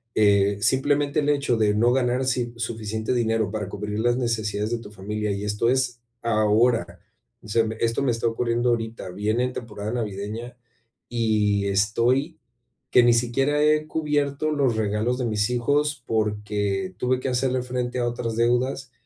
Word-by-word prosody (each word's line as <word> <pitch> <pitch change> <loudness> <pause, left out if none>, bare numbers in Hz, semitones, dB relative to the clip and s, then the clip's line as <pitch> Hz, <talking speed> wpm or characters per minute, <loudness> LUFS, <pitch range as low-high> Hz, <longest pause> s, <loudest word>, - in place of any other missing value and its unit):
eh, 100 -1 +4
simplemente 140 +5 +2
el 145 - 0
hecho 140 -5 +1
de 105 -2 +2
no 120 +3 +3
ganar, 125 0 +1
si 120 -2 -1
suficiente 110 -1 -3
dinero 115 -4 +1
para 105 -3 -4
cubrir 105 +1 -4
las 120 +1 +2
necesidades 110 -3 -1
de 120 - 0
tu 105 -2 -11
familia, 105 +1 -3
y 100 +1 -3
esto 105 +3 0
es 125 -2 0 0.2
ahora, 115 +1 +2 0.4
o - - -14
sea, 115 +2 +2
m 110 0 -3
esto 115 +4 0
me 125 - +2
está 115 0 -1
ocurriendo 120 +1 0
ahorita, 115 -4 -2
viene 105 +6 -1
en 125 - -4
temporada 105 -2 -5
navideña, 110 +1 -4 0.5
y 105 -4 +1
estoy 115 +10 +1 0.5
que 125 - +7
ni 120 -1 +5
siquiera 135 +5 +1
he 155 0 +3
cubierto 150 -1 -1
los 135 -6 +1
regalos 110 +4 0
de 125 - -2
mis 105 0 0
hijos 145 +5 0
porque 105 -3 -1
tuve 125 0 0
que 130 - -2
hacerle 125 0 0
frente 125 0 -3
a 120 - +1
otras 115 -2 -3
deudas, 125 +3 0
115 Hz, 165 wpm, -24 LUFS, 105-125 Hz, 0.5 s, que